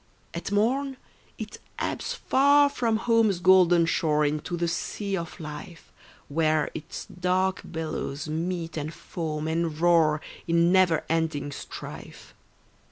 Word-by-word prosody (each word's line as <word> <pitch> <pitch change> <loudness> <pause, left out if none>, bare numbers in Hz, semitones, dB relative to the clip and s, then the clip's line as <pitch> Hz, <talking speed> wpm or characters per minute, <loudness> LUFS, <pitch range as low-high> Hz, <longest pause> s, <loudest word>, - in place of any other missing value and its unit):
At - - -5
morn 260 +6 +1 0.4
it - - -7 0.2
ebbs - - -3
far 285 - +4
from 235 -5 0
home's 225 -4 +3
golden 175 -2 +5
shore 155 -3 +1
Into 150 +4 -2
the 170 0 0
sea 200 +4 -2
of 170 -1 -6
life, 155 +2 -9 0.4
Where 155 0 +1
its 155 - -7
dark 185 +1 0
billows 160 -2 -4
meet 165 +1 -3
and 155 +1 -3
foam 155 -2 -4
and 160 -1 -1
roar 165 -3 +4 0.3
In 170 +1 +3
never 185 -4 +4
ending 160 -3 -1
strife. - - -9
170 Hz, 125 wpm, -26 LUFS, 155-190 Hz, 0.4 s, golden